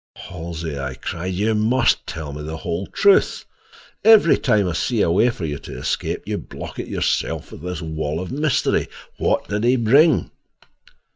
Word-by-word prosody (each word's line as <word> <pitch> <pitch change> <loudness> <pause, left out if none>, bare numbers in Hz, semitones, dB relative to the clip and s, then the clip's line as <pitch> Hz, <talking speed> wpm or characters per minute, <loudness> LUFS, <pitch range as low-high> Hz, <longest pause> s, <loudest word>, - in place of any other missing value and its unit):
"Halsey," 85 -4 -6
I 65 -1 -4
cried, 90 +6 -4
"you 105 +4 +1
must 120 +4 +2
tell 75 -3 -6
me 75 - -7
the 80 +2 -5
whole 85 +4 -4
truth. 200 -1 +3 0.6
Every 215 -7 +7
time 105 -7 +2
I 90 - -1
see 115 +6 0
a 85 - +2
way 115 +8 +4
for 95 -8 -4
you 75 -2 -4
to - - -9
escape - - -2
you - - -2
block - - -9
it - - -4
yourself - - -1
with - - -10
this 90 0 -5
wall 80 -1 -3
of 95 - -6
mystery. 150 +1 +1 0.3
What - - 0
did 105 +1 -2
he 125 +2 +4
bring?" 135 +7 +4
95 Hz, 175 wpm, -21 LUFS, 80-120 Hz, 0.6 s, Every